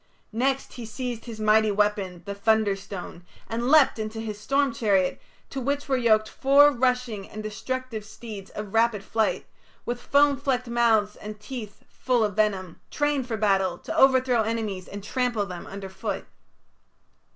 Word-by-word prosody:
Next 265 Hz, +4 st, 0 dB
he 240 Hz, -, -7 dB
seized 240 Hz, 0 st, -5 dB
his 230 Hz, -3 st, -8 dB
mighty 215 Hz, 0 st, +4 dB
weapon, 200 Hz, -4 st, 0 dB
the 200 Hz, -, -4 dB
thunderstone, 200 Hz, -4 st, -1 dB, 0.2 s
and 235 Hz, +2 st, -2 dB
leapt 295 Hz, -6 st, +5 dB
into 215 Hz, +1 st, -4 dB
his 215 Hz, -2 st, -5 dB
storm 275 Hz, +1 st, +1 dB
chariot, 200 Hz, -5 st, +1 dB, 0.3 s
to 270 Hz, -, -4 dB
which 285 Hz, +3 st, -1 dB
were 270 Hz, -, +2 dB
yoked 220 Hz, -3 st, +3 dB
four 280 Hz, +4 st, +5 dB
rushing 250 Hz, -5 st, -1 dB
and 215 Hz, 0 st, -7 dB
destructive 230 Hz, +2 st, -4 dB
steeds 210 Hz, -2 st, -9 dB
of 210 Hz, -2 st, -7 dB
rapid 225 Hz, -3 st, +2 dB
flight, 220 Hz, +1 st, 0 dB, 0.4 s
with 240 Hz, 0 st, -3 dB
foam 285 Hz, 0 st, +4 dB
flecked 260 Hz, -2 st, -1 dB
mouths 225 Hz, -3 st, +2 dB
and 210 Hz, 0 st, -8 dB
teeth 210 Hz, -2 st, -8 dB
full 250 Hz, -3 st, 0 dB
of 205 Hz, -3 st, -1 dB
venom, 195 Hz, -5 st, 0 dB
trained 290 Hz, -3 st, 0 dB
for 225 Hz, -3 st, -2 dB
battle, 195 Hz, -4 st, +2 dB
to -, -, -6 dB
overthrow 260 Hz, -3 st, +4 dB
enemies 215 Hz, -4 st, -3 dB
and 200 Hz, 0 st, -8 dB
trample 245 Hz, -2 st, 0 dB
them 180 Hz, -3 st, -8 dB
underfoot. 195 Hz, -1 st, -5 dB
220 Hz, 155 wpm, -26 LUFS, 205-255 Hz, 0.4 s, leapt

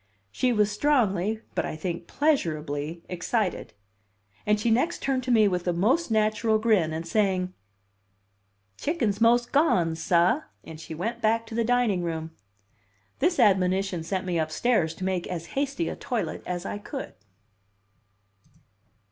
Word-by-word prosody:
She 250 Hz, -, +1 dB
was 210 Hz, -2 st, +2 dB
strongly, 215 Hz, -5 st, +1 dB
but -, -, 0 dB
I -, -, -4 dB
think 170 Hz, +1 st, -4 dB
pleasurably, 160 Hz, -, -1 dB
excited; 185 Hz, +3 st, -2 dB, 0.7 s
and 210 Hz, 0 st, +3 dB
she 225 Hz, +2 st, +1 dB
next 260 Hz, +10 st, +1 dB
turned 270 Hz, -2 st, +1 dB
to 255 Hz, -, 0 dB
me 220 Hz, -3 st, +5 dB
with 180 Hz, -2 st, -2 dB
a 175 Hz, -, +2 dB
most 250 Hz, -, +1 dB
natural 220 Hz, 0 st, +2 dB
grin, 215 Hz, -8 st, +2 dB
and 160 Hz, +1 st, -4 dB
saying, 185 Hz, -1 st, +1 dB, 1.3 s
"Chick'n's 235 Hz, -, -1 dB
mos' 240 Hz, +1 st, +5 dB
gone, 185 Hz, -, +2 dB
sah," 175 Hz, -, +2 dB, 0.4 s
she 160 Hz, 0 st, -8 dB
went 230 Hz, +8 st, -3 dB
back 225 Hz, +1 st, +2 dB
to 225 Hz, -, -10 dB
the 230 Hz, +1 st, +1 dB
dining 240 Hz, -5 st, +2 dB
room. 160 Hz, -1 st, -4 dB, 0.9 s
This 350 Hz, 0 st, +2 dB
admonition 190 Hz, -5 st, +2 dB
sent 185 Hz, +3 st, -3 dB
me 175 Hz, -2 st, 0 dB
upstairs 160 Hz, +2 st, +1 dB
to 185 Hz, -, -8 dB
make 185 Hz, -2 st, -1 dB
as 170 Hz, -2 st, -5 dB
hasty 280 Hz, +4 st, -1 dB
a -, -, -3 dB
toilet -, -, -3 dB
as 180 Hz, 0 st, -3 dB
I 205 Hz, -, -4 dB
could. 270 Hz, +6 st, -7 dB
205 Hz, 145 wpm, -26 LUFS, 175-235 Hz, 1.3 s, me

